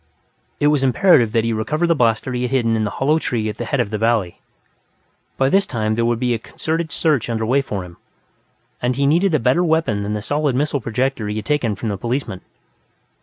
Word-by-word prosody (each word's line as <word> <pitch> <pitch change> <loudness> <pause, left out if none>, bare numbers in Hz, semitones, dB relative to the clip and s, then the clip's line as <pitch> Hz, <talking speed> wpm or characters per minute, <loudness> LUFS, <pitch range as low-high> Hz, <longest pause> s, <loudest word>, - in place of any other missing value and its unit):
It 145 - +3
was 140 -2 +1
imperative 135 - +4
that 115 -2 +2
he 115 0 0
recover 150 +10 -1
the 170 - +3
blaster 120 -2 +1
he 125 - -2
had 125 - -1
hidden 120 -4 +1
in 110 -1 0
the - - -1
hollow 150 +4 +2
tree 110 -7 -2
at 105 - -6
the - - -4
head 140 - -1
of 115 -4 -1
the 105 - -2
valley. 110 -5 0 1.0
By 135 - +2
this 195 +8 +2
time, 110 -3 -1
there 115 +1 0
would 120 0 +1
be 125 -1 +1
a 115 - -2
concerted 160 +6 -3
search 145 -8 0
under 110 -1 -1
way 130 +5 +2
for 100 -8 -5
him, 85 -1 -14 0.8
and 125 +1 0
he 140 +2 +1
needed 170 +4 +3
a - - +2
better 125 +9 +2
weapon 160 -11 +1
than 105 +1 -3
the 105 - -4
solid 145 0 0
missile 145 +1 0
projector 115 0 -2
he 105 - -3
had 110 - -4
taken 140 -8 0
from 110 +3 -4
the 100 - -3
policeman. 120 -3 -3
125 Hz, 230 wpm, -20 LUFS, 110-145 Hz, 1.0 s, imperative